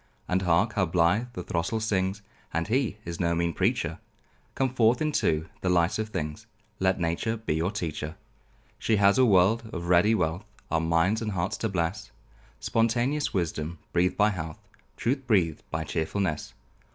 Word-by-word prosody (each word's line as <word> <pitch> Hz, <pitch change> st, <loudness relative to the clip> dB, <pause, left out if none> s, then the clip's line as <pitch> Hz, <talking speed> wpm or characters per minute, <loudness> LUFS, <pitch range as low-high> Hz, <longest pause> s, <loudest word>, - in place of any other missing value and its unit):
And 90 Hz, +1 st, +1 dB
hark! 90 Hz, +5 st, +2 dB
how 95 Hz, -3 st, +1 dB
blithe 90 Hz, +8 st, +2 dB
the 90 Hz, -, -5 dB
throstle 85 Hz, +8 st, -1 dB
sings! 100 Hz, -2 st, -1 dB, 0.3 s
And 85 Hz, +4 st, -2 dB
he 125 Hz, -3 st, +1 dB
is 85 Hz, -1 st, -5 dB
no 85 Hz, -1 st, +1 dB
mean 85 Hz, 0 st, 0 dB
preacher; -, -, 0 dB, 0.6 s
Come 130 Hz, -2 st, 0 dB
forth 120 Hz, -1 st, +4 dB
into 80 Hz, -, +1 dB
the 90 Hz, -, 0 dB
light 90 Hz, +4 st, +2 dB
of 110 Hz, 0 st, -2 dB
things, 80 Hz, +4 st, -4 dB, 0.3 s
Let 95 Hz, 0 st, +2 dB
Nature 85 Hz, +7 st, -1 dB
be 110 Hz, -7 st, -2 dB
your 80 Hz, +3 st, 0 dB
teacher. 80 Hz, -6 st, -4 dB, 0.6 s
She 110 Hz, -, +2 dB
has 100 Hz, +2 st, +4 dB
a 130 Hz, -, +6 dB
world 110 Hz, +2 st, +3 dB
of 85 Hz, -1 st, -5 dB
ready 90 Hz, +5 st, +5 dB
wealth, 85 Hz, -1 st, -1 dB, 0.3 s
Our 80 Hz, -, +2 dB
minds 85 Hz, +7 st, +2 dB
and 105 Hz, -2 st, -2 dB
hearts 90 Hz, +1 st, -1 dB
to 110 Hz, -, -1 dB
bless 95 Hz, +3 st, -2 dB, 0.5 s
Spontaneous 120 Hz, +6 st, +1 dB
wisdom 85 Hz, -2 st, -2 dB, 0.2 s
breathed 90 Hz, +1 st, +2 dB
by 105 Hz, +1 st, +4 dB
health, 80 Hz, -5 st, -5 dB, 0.4 s
Truth 130 Hz, +2 st, -1 dB
breathed 90 Hz, -9 st, +2 dB
by 80 Hz, 0 st, -2 dB
chearfulness. 80 Hz, +1 st, -2 dB
95 Hz, 165 wpm, -27 LUFS, 85-110 Hz, 0.6 s, a